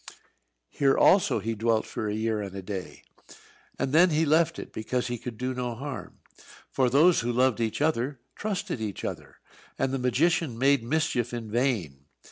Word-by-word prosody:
Here 135 -1 +2
also 190 - +4
he 110 +2 -2
dwelt 110 0 +1
for 110 - -4
a 105 - -2
year 110 -1 -1
and 100 -1 -6
a 95 - -6
day, 95 -1 -7 0.7
and 135 0 -2
then 175 +3 +6
he 160 0 +2
left 165 +2 +3
it - - -8
because 120 +3 -2
he 120 -1 -3
could 120 -2 -7
do 130 +2 -2
no 125 -2 -3
harm. 140 +3 -7 0.5
For 130 -2 +2
those 160 +7 +5
who 120 +1 -1
loved 125 -1 +2
each 115 +5 -1
other 140 -3 0 0.2
trusted 200 - -3
each 105 -3 -4
other, - - -6 0.4
and 135 - 0
the 135 - -1
magician 145 +1 +1
made 140 +1 +3
mischief 125 -3 -1
in 115 -3 -6
vain. 105 - -1
125 Hz, 180 wpm, -27 LUFS, 110-145 Hz, 0.7 s, then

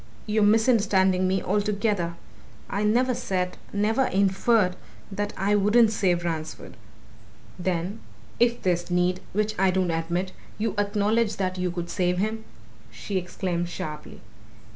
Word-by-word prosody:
"You're 215 0 +1
misunderstanding 205 -4 +3
me 190 +1 0
altogether! 205 -3 0 0.6
I 200 +2 -1
never 245 +4 +2
said 185 -5 -2 0.2
never 220 +6 +1
inferred 195 -1 +2 0.4
that 205 +1 -2
I 200 +2 +1
wouldn't 210 +3 +4
save 180 -5 +1
Ransford." 160 -2 -5 0.8
"Then, 180 +3 -2 0.4
if 240 0 +2
there's 175 -1 0
need, 180 +1 +1
which 215 +2 0
I 190 0 +4
don't 185 -1 +1
admit, 170 +3 -2 0.3
you 215 -1 -1
acknowledge 210 +2 +1
that 185 -2 -2
you 180 0 0
could 175 0 -5
save 180 -1 0
him?" 220 +3 -2 0.4
she 200 - -4
exclaimed 175 -1 -3
sharply. 150 -3 -7
195 Hz, 130 wpm, -25 LUFS, 180-210 Hz, 0.8 s, wouldn't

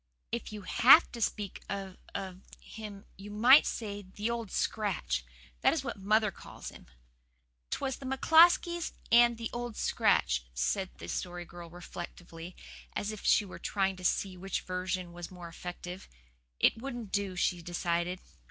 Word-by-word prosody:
If 235 -1 -3
you 210 -2 -7
HAVE 265 - +7
to 235 - -7
speak 205 -2 -2
of 195 -1 -4 0.2
of 190 -2 -5 0.2
him 210 -2 -9
you 200 +1 -9
might 240 +8 +7
say 205 -3 -4
the 205 +4 -4
Old 230 -3 -3
Scratch. 175 - -1 0.4
That - - +5
is 310 - -1
what 240 - -3
mother 210 +2 +3
calls - - -9
him." - - -14 0.8
"''Twas 265 -2 -2
the 270 - -7
McCloskeys 335 +5 +5 0.2
and 235 0 +6
the 230 -1 -4
Old 240 -2 -4
Scratch,'" - - +2
said 185 - 0
the - - -8
Story 175 -1 -4
Girl 170 0 -10
reflectively, 175 0 -9 0.4
as 205 - -2
if 215 - -8
she 210 - +4
were 190 - -9
trying 195 -1 0
to 185 - -10
see 185 +1 +1
which 190 +1 -3
version 185 -1 -3
was 175 0 -6
the 185 - -14
more 175 -1 -8
effective. 180 +2 -8 0.5
"It 225 - +3
wouldn't 240 -6 -5
do," 200 -2 -1
she 180 -1 +1
decided. 175 +1 -1
195 Hz, 160 wpm, -31 LUFS, 180-230 Hz, 0.8 s, HAVE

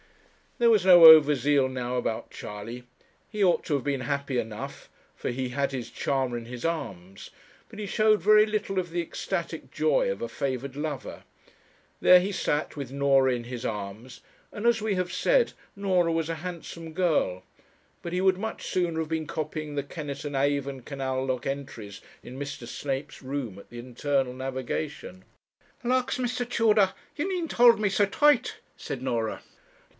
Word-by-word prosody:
There 235 -2 +4
was 210 -5 +3
no 175 -3 +9
over 155 -2 +10
zeal 140 +1 +2
now 125 -1 -3
about 115 -2 -2
Charley. 115 +4 -8 0.5
He 210 -2 -1
ought 180 -2 +3
to 150 - 0
have 135 - -2
been 140 -2 -1
happy 140 -1 -1
enough, 110 -2 -6 0.3
for - - -4
he 130 +1 -3
had 140 +2 -1
his 130 -3 -5
charmer 130 -3 -1
in 115 - -7
his 120 +3 -7
arms; 95 - -5 0.4
but - - -12
he 210 - -3
showed 215 +1 +3
very 215 +3 +6
little 210 -2 -2
of 175 -1 -3
the 175 0 -1
ecstatic 170 - -4
joy - - +2
of - - -5
a - - -2
favoured 135 0 -3
lover. 145 -3 -5 0.8
There 180 - +8
he 190 +3 -2
sat 150 -5 -1
with 140 -4 -6
Norah 135 -1 +3
in 120 -1 -4
his 125 0 -6
arms, 105 +5 -6 0.3
and 210 - -6
as 235 -2 +3
we 215 -2 0
have 180 -1 -2
said, - - +2 0.2
Norah 185 -4 +1
was 165 -1 -1
a 165 - -1
handsome 170 -2 -7
girl; 155 - +1 0.6
but 170 - -5
he 180 - 0
would 190 -1 +3
much 220 +3 -5
sooner 175 -3 0
have 160 -1 -3
been 160 -1 -2
copying 155 -1 -4
the 140 - -1
Kennett 145 0 -7
and 145 -1 -4
Avon 140 -1 0
canal 130 0 -3
lock 130 -2 -2
entries 115 -7 -6 0.2
in 130 +2 -9
Mr. 145 -4 -6
Snape's 135 +2 -4
room 130 -7 -4
at - - -15
the 120 - -9
Internal 130 +2 -1
Navigation. 130 -6 -5 0.6
'Lawks, 255 +2 +1
Mr. 245 -1 -2
Tudor, 215 -5 +3 0.2
you 325 +6 -2
needn't 355 -4 -2
hold 235 -2 +6
me 210 -2 +1
so 200 +1 +2
tight,' 295 +8 +3 0.2
said 130 - -6
Norah. 115 -4 -2
145 Hz, 175 wpm, -27 LUFS, 130-190 Hz, 0.8 s, over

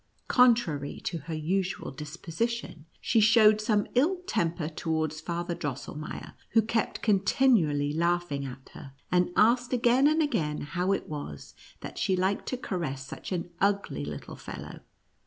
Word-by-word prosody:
Contrary 230 - +3
to 170 - -3
her 160 +3 -7
usual 185 +5 -1
disposition, 165 - -4
she 230 - +2
showed 215 -1 +6
some 215 -2 +2
ill 295 +10 +3
temper 170 - -1
towards 155 -1 -2
Father 170 +1 -3
Drossel 145 -5 -5
meier, 150 +1 -7 0.2
who 225 -1 +5
kept 225 0 -1
continually 190 - +3
laughing 170 -3 0
at 130 0 -8
her, 135 - -11 0.2
and 180 0 +3
asked 245 +3 +3
again 245 +3 +4
and 310 +1 +3
again 155 - -1
how 180 +5 -1
it 195 - -1
was 145 - -7 0.3
that - - -7
she 190 - +2
liked 190 +2 0
to 255 - -2
caress 155 - -4
such 135 - -8
an 175 -1 -3
ugly 200 - +1
little 75 -1 -7
fellow. - - -8
175 Hz, 150 wpm, -28 LUFS, 150-225 Hz, 0.3 s, showed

